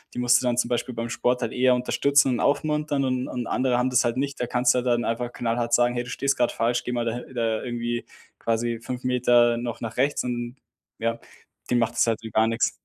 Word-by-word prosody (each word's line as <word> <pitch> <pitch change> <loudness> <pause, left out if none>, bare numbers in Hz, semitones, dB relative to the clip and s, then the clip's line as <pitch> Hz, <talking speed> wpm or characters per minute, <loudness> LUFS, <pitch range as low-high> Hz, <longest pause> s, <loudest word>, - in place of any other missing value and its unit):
Die - - -3
musst 125 0 +4
du - - -3
dann 120 -1 +1
zum 120 - +1
Beispiel 120 0 -2
beim 115 0 -3
Sport 125 +2 0
halt - - -3
eher 125 0 +4
unterstützen 140 +3 +2
und 120 - -1
aufmuntern 150 -1 0
und 130 0 -1
und 125 -2 -4
andere 130 -1 +1
haben 125 +1 +1
das 125 0 +4
halt 120 +1 -1
nicht. 140 +1 -2
Da 125 - -1
kannst 125 0 +2
du 125 - +2
dann 120 -1 +1
einfach 120 +1 -2
knallhart 120 0 -2
sagen: 120 0 +4
„Hey, 120 - -1
du 125 - -10
stehst 140 +2 0
gerade 120 -1 +1
falsch, 120 +2 0
geh - - -4
mal 120 -1 -1
da 115 - -1
hi 125 +1 -9
da 115 -3 -1
irgendwie 120 -1 -3 0.3
quasi 115 0 -1
5 125 +1 -6
Meter 120 -1 +3
noch 120 0 -5
nach 115 -1 -6
rechts." 140 +3 +1
Und, 120 0 -4 0.4
ja, 115 +1 -1 0.5
dem 125 - +4
macht 115 0 0
das - - +2
halt 115 -1 0
gar 110 0 +3
nix. 115 0 +1
120 Hz, 245 wpm, -25 LUFS, 120-125 Hz, 0.5 s, musst